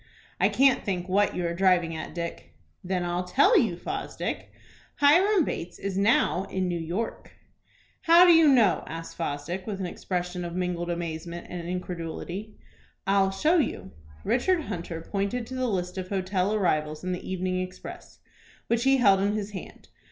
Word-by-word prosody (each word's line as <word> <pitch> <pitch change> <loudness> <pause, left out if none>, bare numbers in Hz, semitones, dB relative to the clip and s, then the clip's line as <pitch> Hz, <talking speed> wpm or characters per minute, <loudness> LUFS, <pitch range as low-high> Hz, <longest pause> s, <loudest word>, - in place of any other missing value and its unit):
I - - +4
can't 270 -1 +3
think 180 -3 -2
what 200 +2 +2
you 180 - -1
are 170 - -1
driving 175 -2 +2
at, 160 - -7
Dick." 170 -1 -6 0.3
"Then 180 -1 -1
I'll 175 +1 -1
tell 280 - +4
you, - - +3
Fosdick. - - -4 0.5
Hiram 350 +5 +5
Bates 175 +1 -5
is 195 -1 -4
now 195 -2 +2
in 190 -2 -2
New 175 -1 -2
York." 175 +8 -4 0.7
"How 340 +1 +8
do 350 - +7
you 325 -1 +6
know?" 235 -9 +4
asked 165 +1 -7
Fosdick, 170 +4 -4
with 200 -3 -4
an 190 - -2
expression 180 0 -4
of 170 0 -5
mingled 180 -1 -2
amazement 170 0 -4
and 175 -1 -5
incredulity. 180 +3 -5 0.5
"I'll 195 0 +3
show 305 - +2
you." 275 - -1 0.3
Richard 345 +8 +2
Hunter 170 - -5
pointed 200 +7 -2
to 260 - -9
the 255 -1 0
list 180 -3 -2
of 185 0 -6
hotel 190 0 0
arrivals 155 -7 0
in 185 - -2
the 180 - -4
"Evening 185 0 -1
Express," 185 0 -9 0.5
which 235 +1 0
he 270 0 +5
held 200 -6 +5
in 200 +1 +1
his 210 -1 -3
hand. 195 - -10
185 Hz, 170 wpm, -27 LUFS, 175-215 Hz, 0.7 s, How